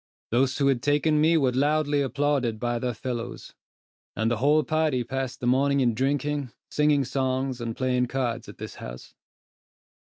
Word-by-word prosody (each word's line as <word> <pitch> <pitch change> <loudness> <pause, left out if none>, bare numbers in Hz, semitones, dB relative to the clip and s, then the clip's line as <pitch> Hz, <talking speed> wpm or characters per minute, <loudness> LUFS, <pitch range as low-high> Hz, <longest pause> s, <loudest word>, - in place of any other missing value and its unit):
Those 130 +2 +2
who 140 - +1
had 135 -3 +2
taken 150 +2 +2
me 165 +2 +4
were 135 -4 +2
loudly 145 +2 +1
applauded 135 -4 0
by 120 0 -1
their 125 -1 -2
fellows; 120 0 -5 0.6
and 110 +3 0
the 120 - +1
whole 150 +5 +3
party 155 -6 +1
passed 130 +1 -4
the - - -3
morning 140 +3 +3
in 120 -3 +2
drinking, 140 +2 -1 0.2
singing 150 -2 +2
songs, 130 -1 -1
and 115 -1 -4
playing 125 -1 +1
cards 120 -2 -2
at - - -11
this - - -7
house. 60 0 -9
130 Hz, 165 wpm, -26 LUFS, 120-145 Hz, 0.6 s, me